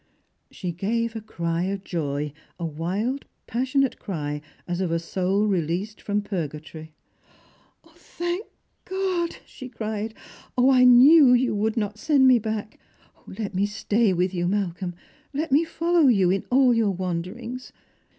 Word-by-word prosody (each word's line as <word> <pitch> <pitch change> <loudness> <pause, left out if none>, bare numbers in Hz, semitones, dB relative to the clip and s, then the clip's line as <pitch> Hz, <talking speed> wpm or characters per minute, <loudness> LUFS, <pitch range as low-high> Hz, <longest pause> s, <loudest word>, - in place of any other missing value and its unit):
She 180 -3 -5
gave 225 +6 -2
a 225 - -4
cry 170 -4 -2
of 195 0 -3
joy, 150 -4 -3 0.2
a 170 - -4
wild 190 - -2 0.2
passionate 260 +2 0
cry, 150 -6 -4 0.3
as 175 +1 -2
of 180 -3 -1
a 165 - +2
soul 190 +4 0
released 190 +2 -1
from 205 0 -1
purgatory. 160 -4 -6 0.9
"Thank 350 +4 -5 0.4
God!" 370 -3 -1
she 260 -2 -10
cried. 220 -1 -4 0.2
" - - -9
0, 255 +2 +5
1 250 -2 +7
knew 285 +1 +8
that - - +7
you 255 -2 0
would 215 +2 -1
not 210 -1 -2
send 280 -2 +4
me 255 -2 +6
back! 215 -1 -4 0.5
Let 200 +1 -5
me 195 +2 +1
stay 210 +1 +1
with 180 +1 0
you, 175 -1 -1
Malcolm; 185 -2 -2 0.4
let 300 +2 -2
me 290 +5 +5
follow 335 -1 +2
you 195 -7 +4
in 195 0 -1
all 255 -1 +5
your 225 -3 +2
wanderings. 190 +7 -4
210 Hz, 150 wpm, -24 LUFS, 180-250 Hz, 0.9 s, knew